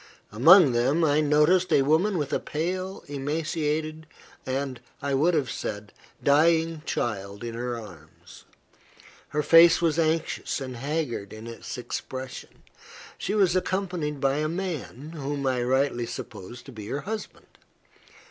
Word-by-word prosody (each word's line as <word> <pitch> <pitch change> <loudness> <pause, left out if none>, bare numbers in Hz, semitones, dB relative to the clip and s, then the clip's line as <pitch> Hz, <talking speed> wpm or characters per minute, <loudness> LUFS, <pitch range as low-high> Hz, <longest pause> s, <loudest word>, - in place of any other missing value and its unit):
Among 155 - +7
them, 130 +8 +2
I 150 0 +3
noticed 150 +5 +3
a 135 - +5
woman 170 +8 +2
with 145 -4 -2
a - - +2
pale, 185 +5 -3
emaciated, 155 +2 -2 0.4
and, 130 -1 -2 0.2
I 140 -1 -2
would 160 +6 +3
have 145 -5 0
said, 105 0 -5 0.3
dying 160 +2 +3
child 100 -2 -3
in 115 -1 -4
her 120 0 -3
arms. 85 -8 -14 0.8
Her 150 0 -1
face 165 +3 +7
was 165 -1 +1
anxious 160 -1 0
and 130 -2 -6
haggard 140 -6 -3
in 110 +1 -9
its 115 +3 -7
expression. 130 +1 -7 0.6
She 205 - -2
was 190 -4 +3
accompanied 180 -6 -1
by 135 0 +1
a 155 +1 0
man, 160 -5 -5
whom 145 -3 -4
I 130 -2 +1
rightly 125 -1 +1
supposed 120 -1 -8
to 135 - -10
be 110 -4 -9
her 140 +6 -3
husband. 215 +2 -7
145 Hz, 140 wpm, -26 LUFS, 125-165 Hz, 0.8 s, Among